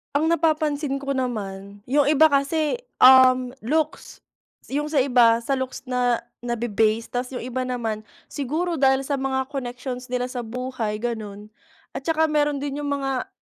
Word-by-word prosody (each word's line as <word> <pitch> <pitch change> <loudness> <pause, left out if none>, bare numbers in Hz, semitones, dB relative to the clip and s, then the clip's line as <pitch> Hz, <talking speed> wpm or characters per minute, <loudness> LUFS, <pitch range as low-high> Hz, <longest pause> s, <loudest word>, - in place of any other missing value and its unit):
Ang 315 +3 +2
napapansin 305 -3 +1
ko 275 0 -3
naman, 205 -6 -4
yung 280 +3 +2
iba 310 +1 +5
kasi, 300 +7 +1 0.2
um, 255 -1 +7
looks, 305 +6 -2 0.5
yung 295 +2 -1
sa 290 -4 +2
iba 235 -3 +4
sa 270 +2 -1
looks 260 0 -5
na 245 -2 0 0.2
nabe-base. 230 -2 0
Tas 250 +1 -2
yung - - -4
iba 255 +1 -3
naman, 225 -4 -2 0.3
siguro 320 +5 -2
dahil 265 0 +3
sa 275 0 -2
mga 265 0 0
connections 250 -1 -5
nila 250 0 -2
sa 250 - -4
buhay, 235 -2 -4
ganon. 215 -3 -5 0.4
At 270 - -7
'tsaka 320 -1 +2
meron 295 -2 +1
din 285 0 -3
yung 290 - -3
mga 270 -2 -2
260 Hz, 155 wpm, -23 LUFS, 240-285 Hz, 0.5 s, um